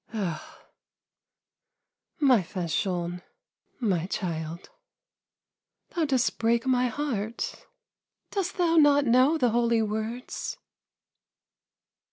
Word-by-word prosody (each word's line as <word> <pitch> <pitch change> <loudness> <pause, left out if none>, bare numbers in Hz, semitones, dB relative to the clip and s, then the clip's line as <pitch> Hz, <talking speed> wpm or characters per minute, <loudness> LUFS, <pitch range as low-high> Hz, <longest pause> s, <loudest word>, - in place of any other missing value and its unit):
" - - -26
Oh, 175 -7 -5 1.6
my 260 -7 +5
Fanchon, 175 0 -2 0.6
my 185 -8 0
child, 165 -3 -4 1.2
thou 335 -3 0
dost 265 -4 +1
break 230 +2 +2
my 250 -1 +2
heart! 230 -4 -3 0.6
Dost 390 -2 -2
thou 335 -2 +3
not 290 -2 +6
know 255 +6 +4
the 245 -6 +2
holy 235 -1 +2
words 220 +3 -4
230 Hz, 90 wpm, -27 LUFS, 190-270 Hz, 1.6 s, not